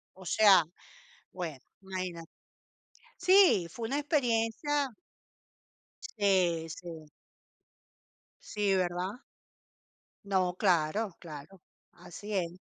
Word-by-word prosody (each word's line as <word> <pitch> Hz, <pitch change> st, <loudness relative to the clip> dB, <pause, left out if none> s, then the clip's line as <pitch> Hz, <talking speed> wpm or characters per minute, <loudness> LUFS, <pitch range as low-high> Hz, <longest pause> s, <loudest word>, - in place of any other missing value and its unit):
O 190 Hz, -, -13 dB
sea, 195 Hz, -3 st, +6 dB, 0.7 s
bueno, 170 Hz, -6 st, -5 dB, 0.2 s
¿imagínate? 185 Hz, -3 st, -6 dB, 0.9 s
Sí, 365 Hz, -, +5 dB
fue 225 Hz, +3 st, -5 dB
una 280 Hz, +2 st, -1 dB
experiencia 280 Hz, 0 st, 0 dB, 1.3 s
Sí, 180 Hz, -5 st, +2 dB
sí. 165 Hz, -1 st, -9 dB, 1.4 s
Sí, 205 Hz, -2 st, 0 dB
¿verdad? 180 Hz, +2 st, -1 dB, 1.1 s
No, 185 Hz, -2 st, +1 dB
claro, 190 Hz, +3 st, +1 dB
claro. 165 Hz, +3 st, -11 dB, 0.3 s
Así 205 Hz, +5 st, -9 dB
es. 180 Hz, -2 st, -2 dB
190 Hz, 80 wpm, -30 LUFS, 175-225 Hz, 1.4 s, sea